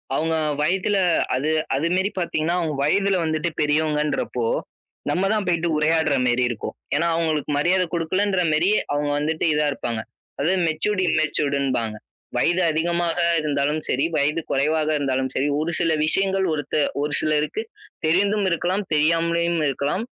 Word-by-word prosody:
அவுங்க 160 +2 0 0.3
வயதில 190 +5 +1 0.4
அது 140 +4 -1 0.3
அது 150 +5 0
மேரி 190 +2 +1
பாத்தீங்கன்னா, 170 -1 -1
அவுங்க 160 -4 -2
வயதுல 195 +6 +2
வந்துட்டு 155 +2 -1
பெரியவங்கன்றப்போ, 150 -4 0 0.7
நம்ம 180 +6 0
தான் 210 -2 0
போய்ட்டு 170 -1 +1
உரையாடுற 155 -1 +2
மேரி 125 +1 +2
இருக்கும். 115 - -5 0.2
ஏன்னா, 165 +4 +1
அவுங்களுக்கு 155 -3 -1
மரியாத 180 +5 +2
குடுக்கலன்ற 185 +3 0
மேரி 165 +5 +2 0.2
அவுங்க 145 0 0
வந்துட்டு 155 +2 -1
இதா 150 0 +2
இருப்பாங்க. 120 -4 -3 0.4
அது 155 +5 +2 0.2
மெச்சூர்ட், 185 +6 0
இம்மெச்சூர்டுன்பாங்க. 140 -7 0 0.4
வயது 175 +2 +2
அதிகமாக 170 +2 0 0.2
இருந்தாலும் 150 +1 0
சரி, 135 +5 +1
வயது 150 +2 +1
கொறைவாக 155 +3 +1
இருந்தாலும் 130 -2 -1
சரி, 135 - +1
ஒரு 160 +3 -1
சில 165 -1 +2
விஷயங்கள் 195 +3 +1
ஒருத்த 145 -1 -4 0.3
ஒரு 150 +1 -2
சிலருக்கு 155 - 0 0.4
தெரிந்தும் 200 +5 +2
இருக்கலாம், 180 +4 0
தெரியாமலயும் 170 +2 +2
இருக்கலாம். 140 - -1
155 Hz, 135 wpm, -22 LUFS, 145-175 Hz, 0.7 s, வயதுல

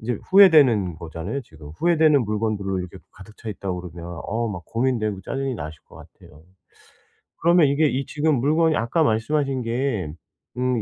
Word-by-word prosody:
인제 115 -1 -3
후회되는 145 - +6
거잖아요 85 - -5
지금. 75 -10 -14
후회되는 155 -6 +3
물건들로 105 -3 -2
이렇게 90 +1 -8
또 - - -25
가득 105 +3 -15
차 115 - -8
있다 95 -1 -5
그러면 90 -2 -8 0.2
어 115 +2 -1
막 90 -5 -6
고민되고 115 -5 -1
짜증이 135 +5 -3
나실 75 -1 -8
것 - - -15
같아요. 75 +1 -17 1.0
그러면 170 -2 +5
이게 145 +3 +2
이 135 0 -2
지금 150 0 +1
물건이 160 +3 +2
아까 120 +8 +1
말씀하신 135 +2 0
게 115 - -2 0.4
음 125 -2 0
115 Hz, 365 characters per minute, -23 LUFS, 95-140 Hz, 1.0 s, 후회되는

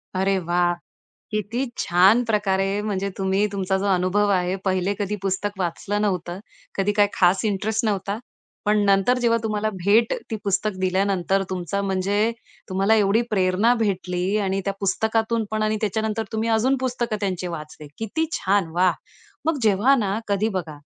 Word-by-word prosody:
अरे 190 +1 +2
वाह! 175 0 +1 0.6
किती 215 +5 -2
छान 190 +6 +4
प्रकारे, 200 -2 0
म्हणजे 200 -2 -2
तुम्ही 195 +2 +1
तुमचा 190 -1 0
जो 195 - -3
अनुभव 185 +3 +2
आहे, 185 0 +1
पहिले 190 +1 0
कधी 205 0 -2
पुस्तक 195 +1 -1
वाचलं 195 +4 -2
नव्हतं, 180 -3 -2 0.4
कधी 195 +1 +2
काय 205 -1 +5
खास 185 +3 +3
इंटरेस्ट 215 +2 0
नव्हता, 200 0 -1 0.5
पण 210 +1 +3
नंतर 200 +6 +3
जेव्हा 230 -1 +2
तुम्हाला 215 0 -1
भेट 220 +3 +4 0.2
ती 220 - -1
पुस्तक 200 +2 0
दिल्यानंतर 190 0 +1
तुमचा, 185 +1 -2
म्हणजे 200 +3 +1 0.4
तुम्हाला 195 +3 +2
एवढी 210 +2 +3
प्रेरणा 190 +3 +3
भेटली 190 -3 -1
आणि 195 -1 0
त्या 200 - 0
पुस्तकातून 220 +3 0
पण 215 0 -1
आणि 215 0 +1
त्याच्यानंतर 220 +1 -1
तुम्ही 220 +1 -1
अजून 230 +5 +2
पुस्तकं 240 -4 -1
त्यांचे 185 -3 -2
वाचले. 155 -2 -8
किती 225 +9 -1
छान! 195 - +1
वाह! 180 0 +4 0.5
मग 325 -2 +1
जेव्हा 215 +6 +4
ना, 205 -3 0
कधी 205 +2 +1
बघा, 155 -4 -7
200 Hz, 155 wpm, -23 LUFS, 185-215 Hz, 0.6 s, काय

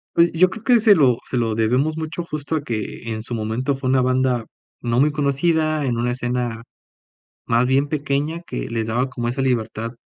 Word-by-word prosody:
Oye, 170 0 +5
yo 180 +3 +4
creo 205 +4 -9
que 245 -1 +5
se 215 -2 +6
lo 130 -8 +4
se 130 - -2
lo 115 -2 0
debemos 125 +8 +1
mucho 160 +1 -4
justo 155 -2 -4
a 155 - -2
que 115 -2 -4
en 110 -1 -4
su 120 - -4
momento 115 +5 -1
fue 135 -1 -3
una 130 0 +3
banda 130 -2 +1 0.4
no 120 0 0
muy 150 +3 +4
conocida 155 +1 +1
en 120 -3 -1
una 120 +1 0
escena 120 -2 -2 0.8
más 120 +2 +2
bien 135 +2 +2
pequeña 145 +2 -1
que - - -5
les 115 -1 -2
daba 125 +4 0
como 120 -3 -4
esa 130 +3 -1
libertad 115 -3 -1
130 Hz, 205 wpm, -21 LUFS, 120-155 Hz, 0.8 s, se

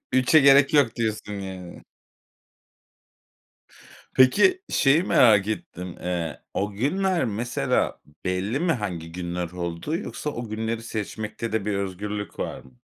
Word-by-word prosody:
Ü - - +4
3'e 135 +5 +5
gerek 140 +1 +6
yok 135 -6 +4
diyorsun 110 -2 -2
yani. 95 -3 -8 2.3
Peki 370 - +5
şeyi 145 +5 +4
merak 105 - +5
ettim. 90 -4 -5
Iıı, 85 -3 -3
o 100 +1 -1
günler 175 - 0
mesela 120 +2 -1 0.2
belli 95 +8 -1
mi 175 0 +1
hangi 90 - -3
günler 85 0 -4
olduğu, 90 - -3
yoksa 150 -5 -5
o 120 -5 -6
günleri 110 +1 -3
seçmekte 110 +1 -5
de 110 -2 -1
bir 105 - 0
özgürlük 100 +1 -4
var - - -4
mı? 65 -1 -21
105 Hz, 130 wpm, -25 LUFS, 90-130 Hz, 2.3 s, gerek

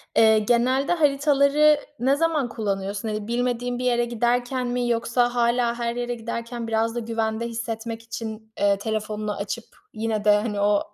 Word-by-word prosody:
Eee, 220 -1 +6
genelde 250 +7 +2
haritaları 290 -1 +4 0.2
ne 265 +3 +3
zaman 305 -5 +1
kullanıyorsun? 200 -1 -3
Hani, 215 0 -4
bilmediğin 245 0 -1
bir - - -3
yere 240 -1 +2
giderken 245 +2 0
mi 245 0 -1
yoksa 240 +1 +1
hâlâ 235 0 +2
her 235 0 -1
yere 245 0 -2
giderken 235 0 -5
biraz 225 +1 0
da - - -1
güvende 225 0 -2
hissetmek 230 0 -5
için, 220 -1 -7
eee, 200 -1 +3
telefonunu 215 0 -3
açıp 215 +3 -4 0.3
yine 220 -1 -2
de, 210 - +6
hani, 210 -1 -3
o 205 0 +1
235 Hz, 160 wpm, -24 LUFS, 220-245 Hz, 0.3 s, Eee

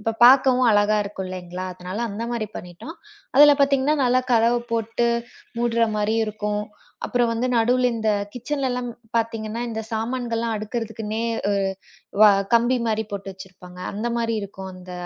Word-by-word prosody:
அப்பப் 225 +1 -3
பாக்கவும் 255 0 +6
அழகா 205 0 +3
இருக்கும் 200 -2 -6
இல்லீங்களா? 185 0 -6
அதனால 180 +3 -7
அந்த 210 +2 -5
மாரி 230 -3 -2
பண்ணிட்டோம். 180 - -9 0.4
அதுல 290 +2 +8
பாத்தீங்கன்னா 275 +1 +3
நல்லா 250 +1 +3
கதவு 235 +1 +4
போட்டு 230 +1 0 0.5
மூடுற 235 -1 +2
மாரியும் 215 +2 +1
இருக்கும். 210 0 -3 0.4
அப்புறம் 240 -1 +1
வந்து 230 +2 -1
நடுல 250 +2 +3
இந்த 220 -1 0 0.2
கிச்சன்லலாம் 250 -1 -2 0.3
பாத்தீங்கன்னா 225 0 -2
இந்தச் 220 -1 -6
சாமான்கள்லாம் 230 0 -2
அடுக்கறதுக்குன்னே 220 0 -4 0.3
ஒரு 200 -1 +1 0.6
வ 215 - +9 0.2
கம்பி 240 +2 +3
மாரி 220 0 0
போட்டு 195 -1 -5
வச்சிருப்பாங்க. 180 -1 -13
அந்த 215 +4 -3
மாரி 230 -1 0
இருக்கும் 190 -1 -8
அந்த 180 0 -11
225 Hz, 145 wpm, -23 LUFS, 205-240 Hz, 0.6 s, வ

